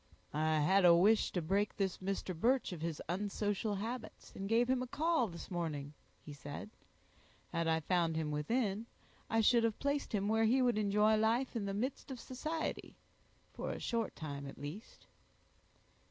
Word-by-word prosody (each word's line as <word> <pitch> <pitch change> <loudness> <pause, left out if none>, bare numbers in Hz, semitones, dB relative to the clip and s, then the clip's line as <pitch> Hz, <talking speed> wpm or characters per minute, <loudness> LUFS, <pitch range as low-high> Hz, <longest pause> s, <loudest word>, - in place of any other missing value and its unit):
"I 155 0 +2
had 190 +6 +4
a 175 -1 +8
wish 210 +5 +4
to 180 - -1
break 200 +5 0
this 195 -2 -1
Mr. 190 -1 -3
Birch 245 +9 +2
of 165 - -7
his 165 -2 -3
unsocial 205 +2 -1
habits, 225 +3 -6
and 195 0 -4
gave 235 +2 +3
him 255 0 +2
a 255 - -3
call 315 -2 +1
this 170 -1 -9
morning," 155 -5 -3 0.3
he 150 - -7
said. 145 +9 -8 0.8
"Had 165 0 0
I 160 0 +2
found 170 0 +1
him 155 -1 -1
within, 210 - -1 0.4
I 225 0 +3
should 235 +1 +5
have 225 -2 +1
placed 280 0 -1
him 200 0 0
where 220 +1 +3
he 245 +4 +4
would 245 -4 +3
enjoy 210 +1 +3
life 230 +4 +1
in 220 -3 -1
the 195 - -2
midst 255 +8 -3
of 260 -2 -6
society, 310 +7 -4 0.6
for - - -4
a - - -4
short 230 -2 -2
time 140 -3 -6
at 135 - -9
least." 150 - -9
205 Hz, 180 wpm, -35 LUFS, 170-230 Hz, 0.8 s, a